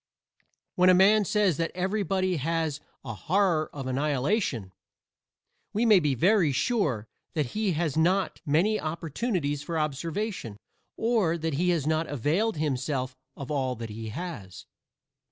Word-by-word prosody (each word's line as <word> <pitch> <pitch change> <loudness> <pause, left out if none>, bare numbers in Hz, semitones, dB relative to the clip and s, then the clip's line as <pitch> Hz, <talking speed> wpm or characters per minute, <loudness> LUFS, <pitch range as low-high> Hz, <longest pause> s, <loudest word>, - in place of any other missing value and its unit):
When 185 -2 +4
a 185 - +7
man 205 +3 +5
says 200 -6 +2
that 165 0 0
everybody 185 -1 0
has 160 0 -1 0.3
"a 120 - -4
horror 165 - +1
of 135 -2 -6
annihilation," 135 - 0 1.0
we 220 +4 +1
may 215 -4 +7
be 150 -5 +1
very 180 - +3
sure 135 - 0 0.3
that 150 -6 -1
he 210 -4 0
has 155 -2 -1
not 185 +5 +1
many 175 +8 +2
opportunities 160 - -2
for 165 +2 -3
observation, 155 - -3 0.4
or 220 -8 +1
that 160 -1 -2
he 175 +6 +1
has 165 -5 +1
not 160 +1 +1
availed 160 - 0
himself 130 -3 -2 0.2
of 140 +1 -6
all 130 -3 0
that 115 -1 -7
he 110 +1 -6
has. 110 - -7
160 Hz, 140 wpm, -27 LUFS, 140-190 Hz, 1.0 s, a